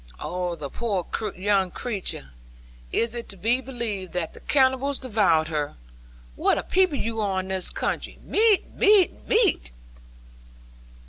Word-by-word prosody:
Oh, 180 -1 -3
the 140 -4 -6
poor 200 -7 -2 0.3
young 195 -1 +2
creature! 190 - -3 0.6
Is 230 0 0
it 235 -1 -5
to 195 - -7
be 235 +7 +2
believed 230 -8 -4
that 175 -3 -2
the - - -12
cannibals 265 0 +2
devoured 205 - +2
her! 150 -2 -2 0.6
What - - +2
a - - -2
people 370 -5 +2
you 225 -2 -2
are 195 -2 0
in 185 0 -5
this 190 -1 0
country! - - -3
Meat, 430 -2 +3
meat, 405 -3 +5
meat!' 440 - +2
215 Hz, 140 wpm, -25 LUFS, 185-265 Hz, 0.6 s, meat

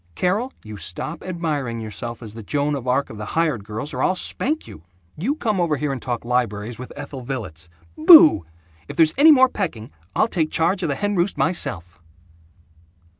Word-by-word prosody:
Carol, 205 +8 0
you 110 -1 -9
stop 100 - -5
admiring 150 -10 -3
yourself 115 +2 -6
as 105 -2 -9
the 115 - -8
Joan 145 +7 -1
of 130 -3 -4
Arc 130 +3 0
of 110 - -10
the 105 - -5
hired 155 -11 +1
girls, 110 +7 -5
or - - -3
I'll 185 - +2
spank 305 - -2
you. 75 - -12 0.3
You 235 - -1
come 215 - -1
over 165 -3 +1
here 140 0 -2
and 130 - -6
talk 120 -2 -4
libraries 120 -2 -1
with 125 - -8
Ethel 140 -2 -7
Villets. 90 - -6 0.3
Boooooo! 320 - +8 0.4
If - - -8
there's 160 -1 +4
any 305 +4 +7
more 260 -3 +6
pecking, 160 - -4 0.2
I'll 220 - +3
take 165 -8 -1
charge 180 +4 +1
of 170 - -1
the 140 - 0
hen 205 +4 -1
roost 175 +3 0
myself!" 90 - -2
145 Hz, 190 wpm, -22 LUFS, 115-185 Hz, 0.4 s, Boooooo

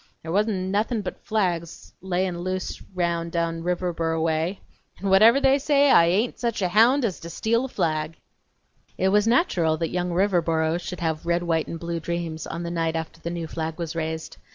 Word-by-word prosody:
There 160 - -5
wa'n't 205 +4 +2 0.2
nothin' 215 +2 0
but - - -7
flags 175 -6 -2
layin' 185 0 -1
roun' 175 0 -6
loose 185 0 -3 0.2
down 170 -1 -1
Riverboro 170 -2 -1
way, 165 +4 0 0.4
n' 195 - -2
whatever 220 +7 +7
they 275 0 +4
say, 285 0 +3
I 170 - +7
hain't 205 +8 0
sech 235 -2 -1
a 180 - +1
hound 235 +7 +4
as 195 -6 -2
to 170 - -8
steal 230 +8 0
a - - -3
flag!" 155 -7 -2 0.8
It 190 - +2
was 210 +2 +3
natural 180 - +2
that 165 0 -2
young 180 0 -1
Riverboro 170 -3 +1
should 180 0 -7
have 160 0 -2
red, 170 0 +1
white, 165 -2 0
and 165 - -6
blue 170 0 -3
dreams 165 -1 -4
on 170 - -5
the 170 - -4
night 165 -1 -1
after 160 0 -5
the 170 - -4
new 170 -1 -4
flag 160 0 -4
was 165 -1 -4
raised. 160 0 -4
170 Hz, 195 wpm, -24 LUFS, 165-200 Hz, 0.8 s, whatever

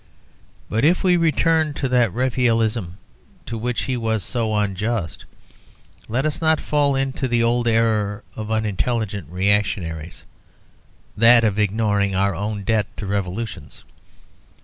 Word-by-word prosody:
But 110 +3 -1
if 170 +5 +3
we 180 -2 +4
return 160 -2 +2
to 135 - -1
that 120 -5 +3
Raphaelism 115 -5 0 0.5
to 115 - -5
which 120 +2 -2
he 130 - -2
was 110 -3 -1
so 110 +1 -2
unjust, 105 -2 -2 0.8
let 125 +6 0
us 155 +1 -2
not 160 -1 +3
fall 145 -2 +1
into 135 0 -1
the 120 -1 +1
old 120 +1 +1
error 110 -3 +1
of 110 -1 -6
intelligent 110 -1 -2
reactionaries, 90 -4 -1 0.9
that 115 +2 +6
of 110 -1 +1
ignoring 105 -1 +1
our 100 +1 +1
own 105 0 -4
debt 110 -1 +1
to 105 - -5
revolutions. 100 -4 -4
110 Hz, 130 wpm, -21 LUFS, 100-125 Hz, 0.9 s, that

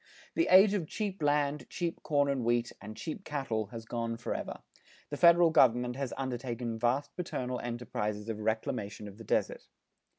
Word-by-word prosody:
The 335 - +2
age 195 +2 +8
of 180 -6 -1
cheap 200 -2 -4
land, 145 -2 +1
cheap 170 -2 -3
corn 145 -2 +2
and 135 -3 0
wheat, 120 +1 +1
and 110 +1 -9
cheap 165 +5 -5
cattle 135 - -2
has 115 +1 -8
gone 115 0 -3
forever. 120 - -4 0.5
The 145 - -3
federal 170 0 +7
government 125 -3 +4
has 135 -2 -3
undertaken 120 -3 -3
vast 125 +5 0
paternal 125 -8 -3
enterprises 110 -3 -3
of 110 -2 -3
reclamation 110 -1 -2
of 100 +2 -11
the - - -8
desert. - - -1
125 Hz, 165 wpm, -31 LUFS, 115-150 Hz, 0.5 s, age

